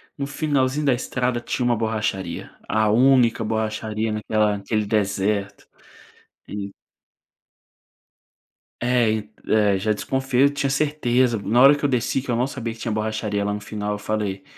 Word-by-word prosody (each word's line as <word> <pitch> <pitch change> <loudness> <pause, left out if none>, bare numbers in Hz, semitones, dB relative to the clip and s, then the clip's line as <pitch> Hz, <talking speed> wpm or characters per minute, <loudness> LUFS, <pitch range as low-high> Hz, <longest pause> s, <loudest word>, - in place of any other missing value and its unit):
no 140 -1 -4
finalzinho 145 -1 0
da 135 - +4
estrada 125 0 -1
tinha 125 +1 -2
uma 120 -1 +3
borracharia, 110 -6 -3
a 110 -1 +2
única 125 -1 +4
borracharia 110 0 -2
naquela 105 -1 0
naquele 105 +1 -1
deserto. 100 -1 -1 0.8
E 100 -1 -5 2.1
É 120 -2 +2
e 105 -1 -3 0.2
é 105 -3 +3
já 105 +3 0
desconfiei, 130 +4 0
eu 140 - +5
tinha 145 -1 -1
certeza, 130 -4 +1
na 120 +5 +3
hora 140 +2 +8
que 150 - -11
eu 145 - +3
desci 125 +1 0
que 125 - -4
eu 120 - +1
não 125 +3 +1
sabia 115 -4 -5
que 115 - -16
tinha 115 - -3
borracharia 105 -1 -2
lá 105 0 -1
no 105 - -3
final, 105 0 -4
eu 105 - -3
falei: 105 -2 -3
110 Hz, 160 wpm, -23 LUFS, 105-125 Hz, 2.1 s, hora